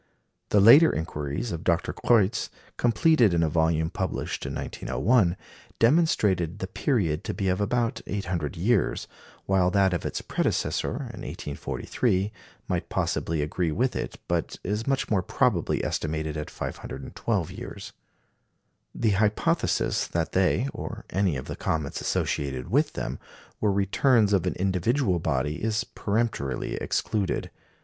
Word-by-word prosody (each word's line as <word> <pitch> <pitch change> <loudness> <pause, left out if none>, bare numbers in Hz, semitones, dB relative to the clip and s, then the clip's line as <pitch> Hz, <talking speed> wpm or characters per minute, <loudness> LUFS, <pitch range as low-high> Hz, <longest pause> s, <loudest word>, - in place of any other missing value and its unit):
The 105 - +4
later 140 +11 +8
inquiries 75 +6 -3
of 85 0 -4
Dr. 85 0 +1
Kreutz, 115 -2 +2 0.3
completed 120 - +4
in 85 - +3
a 80 - +2
volume 80 0 +1
published - - -3
in - - -4
1901, 90 - +1 0.4
demonstrated 105 - +3
the 95 - -3
period 95 - 0
to - - -4
be 95 -1 0
of 95 +2 0
about 115 +2 0
800 90 -8 -3
years, 100 +4 +1 0.4
while 95 -2 +3
that 95 0 +3
of 85 - -2
its - - -2
predecessor - - -1
in - - -6
1843 95 - -2 0.4
might - - -2
possibly 80 -2 -1
agree 80 +2 -1
with 125 +10 0
it, - - -3
but 85 -1 -1
is 105 +5 -2
much 135 -2 0
more 100 -4 +3
probably - - +1
estimated 80 -1 -2
at 75 0 -4
512 65 0 -4
years. - - -8 1.0
The 110 -2 +2
hypothesis 105 +2 +1
that 85 -1 -1
they, 95 +7 +2
or - - -6
any 95 -5 +1
of 65 - -6
the - - -5
comets 75 -3 -2
associated 65 -3 -2
with - - +2
them, - - -4 0.4
were 105 - +2
returns 105 +3 +3
of 95 -4 +2
an - - -1
individual 95 +2 +1
body 75 0 -1
is 110 +1 0
peremptorily 105 - -2
excluded. 105 -4 -1
95 Hz, 140 wpm, -26 LUFS, 80-110 Hz, 1.0 s, later